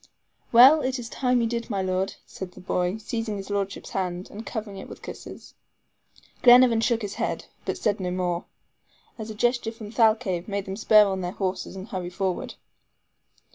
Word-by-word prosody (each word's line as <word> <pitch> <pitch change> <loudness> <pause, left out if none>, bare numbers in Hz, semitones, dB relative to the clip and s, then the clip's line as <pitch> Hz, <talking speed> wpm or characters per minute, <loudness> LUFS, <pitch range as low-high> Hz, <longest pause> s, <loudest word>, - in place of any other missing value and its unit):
"Well, 265 +6 +8
it 260 -1 -1
is 235 -2 -7
time 250 -1 +1
you 230 - +1
did, 235 +1 -3
my 195 -3 -1
Lord," 185 +1 -1
said 185 -1 -8
the - - -13
boy, 180 +2 -1
seizing 220 0 -3
his 195 +1 -7
lordship's 200 -1 -3
hand, 180 -1 -3
and 215 +2 -7
covering 215 -4 -6
it - - -9
with - - -11
kisses. - - -10 0.9
Glenarvan 245 -2 +7
shook 230 -1 +1
his 205 -1 -4
head, - - -2 0.2
but - - -2
said 205 -1 0
no 180 -1 -2
more, 180 -1 -2 0.7
as 220 0 -6
a 215 - -6
gesture 240 +1 +1
from 220 -2 -10
Thalcave 215 -6 +2
made 200 -1 -3
them 190 - -5
spur 215 0 +6
on 190 -1 -2
their 180 0 -3
horses 190 -1 -3
and 190 +2 -7
hurry 180 -2 -4
forward. 185 0 -3
205 Hz, 185 wpm, -25 LUFS, 190-230 Hz, 0.9 s, Well